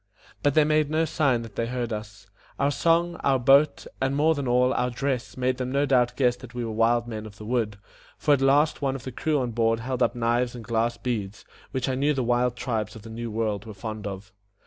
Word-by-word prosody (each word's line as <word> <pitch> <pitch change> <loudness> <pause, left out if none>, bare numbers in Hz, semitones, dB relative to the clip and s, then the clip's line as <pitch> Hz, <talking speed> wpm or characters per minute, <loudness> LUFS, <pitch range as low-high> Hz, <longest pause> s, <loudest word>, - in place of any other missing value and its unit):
But 145 -1 +2
they 155 - +6
made 155 -1 +2
no 160 +1 +1
sign 135 -7 +1
that 110 -3 -11
they 115 - -1
heard 120 -2 -3
us. 105 -1 -7 0.3
Our 140 +1 +2
song, 170 +3 +2
our 135 -3 +2
boat, 135 +4 +4 0.2
and, 135 +1 +1
more 155 +3 +4
than 140 -4 -3
all, 125 +1 +3
our 125 0 0
dress, 130 0 -3
made 130 0 0
them 130 -1 -3
no 140 +2 +2
doubt 125 -3 +2
guess 125 -3 +2
that 125 -1 -12
we 120 -1 -2
were 115 - -4
wild 115 +2 +2
men 110 -2 -6
of 105 -1 -14
the 105 - -9
wood; 110 -3 -1 0.4
for 150 - +3
at 140 - +2
last 145 +4 +3
one 135 -1 0
of 130 - -7
the 130 - -6
crew 150 +5 0
on 125 -3 -1
board 115 0 +1
held 125 +2 -3
up - - +2
knives 120 +1 0
and 115 -2 -8
glass 115 0 0
beads, 110 -4 -4 0.2
which 130 0 -2
I 130 - 0
knew 140 +3 +1
the 130 - 0
wild 120 +1 +1
tribes 110 -4 -3
of 110 - -11
the 115 - -10
New 115 +1 -5
World 110 -2 -2
were 110 -2 -9
fond 110 +1 -5
of. 100 +2 -8
125 Hz, 245 wpm, -26 LUFS, 115-135 Hz, 0.4 s, they